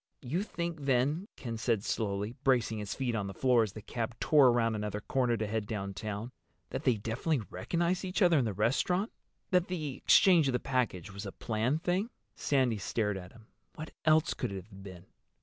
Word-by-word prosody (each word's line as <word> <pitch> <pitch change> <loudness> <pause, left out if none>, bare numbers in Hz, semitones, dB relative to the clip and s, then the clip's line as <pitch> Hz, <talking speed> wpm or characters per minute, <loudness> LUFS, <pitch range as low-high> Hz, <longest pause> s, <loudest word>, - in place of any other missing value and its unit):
"You 150 +9 -1
think 170 -7 -4
then," 140 +8 +1
Ken 115 -3 -5
said 110 -3 +1
slowly, 105 0 -2
bracing 120 -4 +2
his 100 -2 -4
feet 125 -3 -1
on 105 -3 -1
the 95 - -7
floor 125 -3 +4
as 105 -3 -1
the 110 - -9
cab 115 +1 -4
tore 145 -4 +6
around 120 -2 +3
another 105 -1 -3
corner 120 +2 0
to 110 - -1
head 105 0 -2
downtown, 105 +2 -4 0.4
"that 145 - -4
they 125 -3 +4
definitely 115 +4 -1
recognized 170 - -1
each 190 +2 0
other 170 -4 +5
in 125 - +1
the 110 - 0
restaurant—that 180 - -1
the 155 -6 -3
exchange 175 -6 +5
of 135 - +1
the 125 - +1
package 115 -9 -1
was 100 +1 -6
a - - -5
planned 120 - -1
thing?" 185 +6 0 0.3
Sandy 130 -6 +1
stared 105 +1 -1
at 90 -1 -8
him. 115 -1 -17 0.3
"What 155 0 -7
else 155 0 +4
could - - -3
it - - -5
have 95 -2 -14
been? 95 -2 -10
120 Hz, 195 wpm, -31 LUFS, 105-155 Hz, 0.4 s, tore